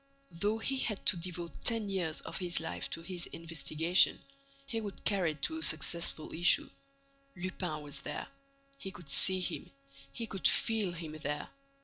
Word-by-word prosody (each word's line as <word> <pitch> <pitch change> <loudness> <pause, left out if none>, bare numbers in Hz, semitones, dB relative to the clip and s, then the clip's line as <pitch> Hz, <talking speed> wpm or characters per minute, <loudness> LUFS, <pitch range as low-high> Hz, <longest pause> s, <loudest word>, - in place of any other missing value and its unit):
Though 205 +6 0
he 265 +4 -1
had 210 -5 -1
to - - +5
devote 170 0 -5
ten 230 -3 +3
years 180 -5 -2
of - - -5
his 175 -2 0
life 165 - -4
to 165 - -3
this 175 0 -1
investigation, 165 +1 +2 0.5
he 225 +7 -3
would 205 -2 -7
carry 185 -6 +2
it 150 - -19
to 160 - +1
a - - -7
successful 160 +1 0
issue. 170 +2 +4 0.6
Lupin 180 -4 -4
was 145 -1 -4
there. - - -5 0.5
He 195 - -5
could 175 -6 -8
see 185 +4 +7
him, - - -3 0.4
he 230 - -4
could 195 -4 +1
feel 220 -5 +2
him 165 -2 -7
there. 150 0 -3
175 Hz, 165 wpm, -32 LUFS, 160-195 Hz, 0.6 s, see